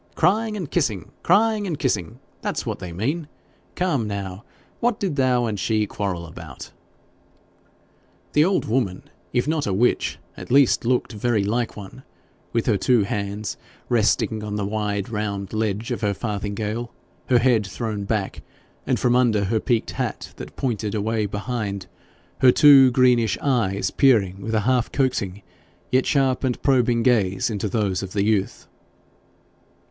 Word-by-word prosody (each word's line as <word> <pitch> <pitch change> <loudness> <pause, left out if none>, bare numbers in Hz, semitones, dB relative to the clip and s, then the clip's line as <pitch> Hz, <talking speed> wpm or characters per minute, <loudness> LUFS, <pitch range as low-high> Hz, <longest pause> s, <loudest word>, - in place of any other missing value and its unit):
Crying 215 +2 +2
and 175 -8 -5
kissing 115 - -1
crying 215 -1 +3
and 165 -5 -2
kissing 115 - -2 0.2
that's - - -3
what - - -3
they 90 - -7
mean. 140 - -2 0.5
Come 145 -11 0
now 100 0 -5 0.4
what 240 -2 0
did 185 -7 -1
thou 130 -3 +2
and 105 -3 -3
she 110 0 +1
quarrel 95 -4 -3
about?' 80 - -10 1.6
The 150 - +5
old 190 +3 +1
woman, 110 -6 -1 0.3
if 125 +3 0
not 155 -4 0
a 100 - 0
witch, 120 +5 +1 0.2
at - - -10
least 135 -2 +4
looked 125 0 0
very 110 0 0
like 115 +3 -1
one, 100 -2 -10 0.5
with 115 - 0
her 110 -4 +2
two 120 +1 +3
hands 100 -1 -3 0.3
resting 110 -1 +1
on 105 -1 -4
the 105 -1 -1
wide 105 -1 -2
round 105 -3 -3
ledge 110 0 -2
of - - -3
her 100 -2 0
farthingale, 105 +2 -3 0.4
her 125 - +4
head 115 -4 +3
thrown 105 -1 -4
back, 100 -2 -2 0.5
and - - +1
from 120 0 +2
under 115 -5 +3
her 110 +3 0
peaked 115 -1 0
hat - - -4
that - - -9
pointed 110 -5 -2
away 110 0 0
behind, 105 -2 -4 0.5
her 130 - +7
two 140 -2 +8
greenish 125 -2 +3
eyes 115 -8 0
peering 100 -8 +3
with 110 +3 -2
a 110 - +2
half 125 +1 +1
coaxing, 105 -8 -1 0.5
yet 130 +1 +2
sharp 135 -3 +1
and 125 -2 0
probing 125 -4 +3
gaze 115 -1 +2
into 105 0 -2
those 100 -3 0
of 95 -1 -7
the 100 -2 +1
youth. 105 -2 -1
110 Hz, 155 wpm, -23 LUFS, 100-130 Hz, 1.6 s, two